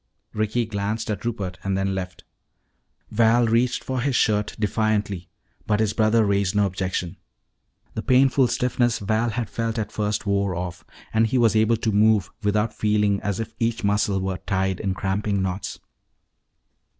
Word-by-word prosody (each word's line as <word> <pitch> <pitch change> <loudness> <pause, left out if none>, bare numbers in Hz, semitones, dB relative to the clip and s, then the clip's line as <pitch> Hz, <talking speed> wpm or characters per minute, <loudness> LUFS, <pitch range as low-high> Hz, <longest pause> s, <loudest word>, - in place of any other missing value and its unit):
Ricky 110 +2 0
glanced 110 +1 -3
at 100 -2 -4
Rupert 100 -6 -3
and 95 0 0
then 95 0 0
left. 90 -1 -5 0.9
Val 115 +2 +4
reached 120 +2 +1
for 130 -1 -2
his 135 0 0
shirt 105 -2 +1
defiantly. 105 -4 -1 0.4
But 105 -1 +2
his 110 -2 +1
brother 110 0 +3
raised 100 0 +1
no 105 0 +4
objection. 90 -2 -3 0.8
The 110 - -3
painful 130 +1 +4
stiffness 120 -1 +1
Val 110 +3 0
had 115 0 -2
felt 115 +2 -3
at 105 -1 -3
first 105 0 -2
wore 100 -2 0
off 90 0 -5 0.3
and 110 0 +3
he 130 +4 0
was 115 -2 +3
able 110 +1 +3
to 110 0 -1
move 105 -1 +3
without 105 +1 +1
feeling 105 -2 +1
as 100 0 -2
if 115 0 -5
each 115 -1 -1
muscle 100 -1 +1
were 95 -1 -3
tied 95 -1 -1
in 95 -3 -2
cramping 100 +1 -1
knots. 95 +1 -4
105 Hz, 160 wpm, -23 LUFS, 100-115 Hz, 0.9 s, Val